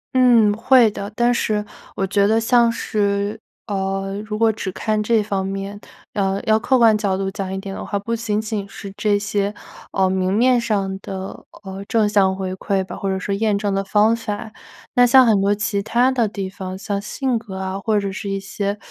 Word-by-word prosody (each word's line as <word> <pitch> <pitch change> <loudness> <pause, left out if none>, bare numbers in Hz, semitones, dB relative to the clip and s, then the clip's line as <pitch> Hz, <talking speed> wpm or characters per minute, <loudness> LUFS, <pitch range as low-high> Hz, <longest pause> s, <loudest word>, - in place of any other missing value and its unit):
嗯， 235 -5 +5
会 235 0 +4
的， 200 +1 -6
但 240 +1 +3
是 210 -3 0 0.3
我 195 - 0
觉 200 +1 +2
得 220 +2 +3
像 235 0 +4
是 205 -1 -1 0.3
呃， 195 -1 -2
如 210 0 -4
果 225 0 +4
只 205 -3 -5
看 215 +2 -1
这 215 0 +2
方 195 -2 -2
面， 195 +1 -5 0.3
呃， 195 -1 0
要 220 0 +3
客 260 +3 +2
观 230 -3 +5
角 200 -3 0
度 195 0 -2
讲 195 -2 -4
一 190 - -3
点 195 0 -6
的 - - -6
话， 205 - -2
不 230 +4 -2
仅 220 -2 -1
仅 210 -2 -4
是 195 -1 -9
这 205 -1 +1
些， 205 0 -1 0.4
呃， 190 -1 +2
明 185 0 0
面 240 +3 +3
上 195 -4 -1
的， 190 0 -7 0.2
呃， 195 0 -7
正 220 -2 +2
向 195 -2 +3
回 190 -1 -4
馈 190 0 -1
吧， - - -8
或 195 - -3
者 190 - 0
说 195 +2 -3
验 210 0 +1
证 200 -1 -1
的 195 0 0
方 210 +3 +3
法。 215 -1 -5 0.4
那 245 - +5
像 260 +1 +7
很 215 -4 +3
多 200 +1 +2
其 205 -1 -1
它 245 +5 +2
的 240 -4 +1
地 200 -2 -4
方， 190 -1 -7
像 200 +1 -3
性 250 +3 -1
格 200 -4 -9
啊， 190 +1 -3
或 215 0 +1
者 200 -1 -3
是 200 +1 -5
一 195 - -1
些， 200 +1 -3
205 Hz, 230 characters per minute, -20 LUFS, 195-220 Hz, 0.4 s, 像